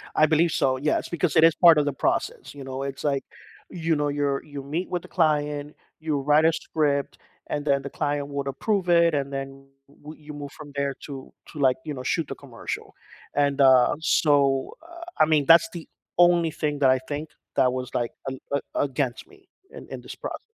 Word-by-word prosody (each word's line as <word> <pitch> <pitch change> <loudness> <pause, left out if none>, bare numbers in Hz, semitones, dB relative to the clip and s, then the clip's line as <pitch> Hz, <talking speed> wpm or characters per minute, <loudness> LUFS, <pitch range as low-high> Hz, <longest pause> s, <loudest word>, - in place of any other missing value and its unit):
I 155 - +5
believe 160 +1 +2
so, 130 -1 +1
yes, 150 +3 -1
because 170 -2 -1
it 160 - +6
is 165 0 +6
part 170 -3 +7
of 145 - +3
the 145 - -1
process, - - -2
you 140 -1 -9
know, 135 +1 -5
it's 140 -1 -6
like, 140 -2 0 0.5
you 165 -2 -1
know, 145 0 0
you're 145 -1 -1
you 145 -2 -8
meet 160 +6 -3
with 180 -2 -2
the - - -13
client, 150 -3 0 0.2
you 155 -3 -1
write 150 +3 +3
a 165 - +4
script 145 -4 -1 0.3
and 145 0 -3
then 140 -1 +2
the 140 - -6
client 145 -1 -2
would 140 -1 -4
approve 180 +6 -1
it, 170 -1 +5
and 140 -1 -1
then 135 0 -6 0.2
wou 150 +2 -12
you 150 -1 -11
move 145 -1 -7
from 150 -2 -12
there 140 -1 -1
to 135 -2 -9 0.2
to, 150 - -9
like, 130 -2 +3
you 150 - -4
know, 130 - -7
shoot 160 +4 -1
the - - -6
commercial. 125 -5 -7 0.4
And, 140 -1 +1
uh 130 -1 +6
so, 140 -4 +2
uh 340 0 -12 0.2
I 155 - +7
mean, 155 -3 +2
that's 165 +8 +6
the 170 -2 -8 0.3
only 175 -2 +4
thing 150 -1 -2
that 135 -2 +4
I 130 0 +4
think 150 +1 -4 0.3
that 125 -1 +3
was, 130 -1 -4
like, 120 -1 -1 0.2
a - - -5 0.2
a - - +1 0.2
a - - +1
against 135 -2 -3
me 395 -1 -21 0.2
in - - -11
in - - -7
this - - -9
process. - - -6
145 Hz, 215 wpm, -25 LUFS, 140-160 Hz, 0.5 s, part